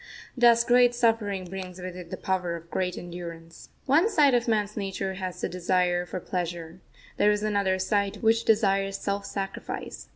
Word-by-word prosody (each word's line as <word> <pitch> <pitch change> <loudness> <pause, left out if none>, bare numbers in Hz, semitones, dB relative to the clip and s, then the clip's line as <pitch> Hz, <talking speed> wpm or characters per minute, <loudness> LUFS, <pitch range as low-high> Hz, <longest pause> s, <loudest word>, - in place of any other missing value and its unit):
Thus 235 -2 +5
great 245 0 +4
suffering 225 -5 +1
brings 185 0 -7
with 180 0 -6
it 180 -2 -9
the - - -5
power 180 -2 -1
of 170 0 -11
great 180 -1 -1
endurance. 170 -1 -9 0.2
One 315 +10 +4
side 295 - +4
of 240 -1 +2
man's 210 -2 0
nature 195 -1 -3
has 185 -1 -5
the - - -1
desire 180 0 0
for 185 - -4
pleasure 175 -1 -5 0.4
there 210 - +4
is 210 0 +1
another 200 -3 +1
side 200 +1 0
which 225 +1 +3
desires 195 -3 +2
self 200 0 -3
sacrifice. 195 -1 -6
195 Hz, 170 wpm, -27 LUFS, 180-220 Hz, 0.4 s, Thus